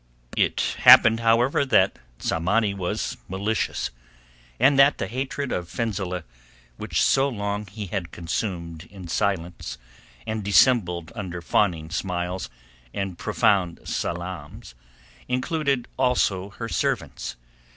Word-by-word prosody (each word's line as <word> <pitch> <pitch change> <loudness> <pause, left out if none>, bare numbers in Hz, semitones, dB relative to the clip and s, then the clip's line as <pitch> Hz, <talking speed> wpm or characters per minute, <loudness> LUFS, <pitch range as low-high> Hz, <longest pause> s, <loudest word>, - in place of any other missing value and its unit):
It - - +1
happened, 110 0 +8
however, 115 +4 +3
that 100 -8 +3 0.2
Tsamanni 100 - +1
was 95 -3 -3
malicious, 100 -2 -2 0.7
and 135 +3 +5
that 140 +1 +6
the - - -2
hatred 130 +5 -3
of 90 -1 -3
Fenzileh 95 -6 -3 0.5
which - - -2
so 135 +1 +3
long 105 -3 -3
he 105 +2 -6
had 95 -2 -4
consumed 85 -2 -4
in 95 -3 -11
silence 85 -5 -2 0.5
and 110 -1 -3
dissembled 95 -4 +3
under 95 -6 -5
fawning 85 -2 0
smiles 90 0 -3 0.5
and 95 -3 -3
profound 90 -4 +1
salaams 85 -7 -5 0.5
included 135 0 0
also 100 -7 +1
her 115 +3 -6
servants. - - -2
100 Hz, 110 wpm, -24 LUFS, 90-115 Hz, 0.7 s, happened